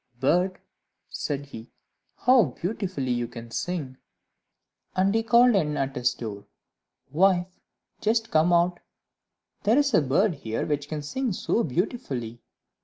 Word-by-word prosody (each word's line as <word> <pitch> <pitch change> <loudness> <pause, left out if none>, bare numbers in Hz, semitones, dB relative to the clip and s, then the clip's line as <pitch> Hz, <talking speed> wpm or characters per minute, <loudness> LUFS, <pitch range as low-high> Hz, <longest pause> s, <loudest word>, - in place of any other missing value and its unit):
"Bird," 180 +8 +2 0.5
said 140 -1 -3
he, 115 -4 -11 0.5
"how 250 -3 +5
beautifully 180 - -2
you 120 -1 -1
can 115 0 -10
sing!" 150 -4 -4 1.0
And 190 +2 +2
he 225 - +2
called 240 +2 +5
in 150 -6 +1
at 135 0 -2
his 125 0 +1
door, 105 -4 -7 0.6
"Wife, 180 +1 +2 0.4
just 225 +1 0
come 160 +2 +3
out; 175 +1 +3 0.8
there 220 +5 +3
is 285 -3 +2
a 180 - +5
bird 165 +9 +2
here 115 -6 -4
which 145 -1 -2
can 150 -2 -4
sing 245 - -2
so 230 - 0
beautifully." 125 - -3
170 Hz, 135 wpm, -26 LUFS, 130-200 Hz, 1.0 s, how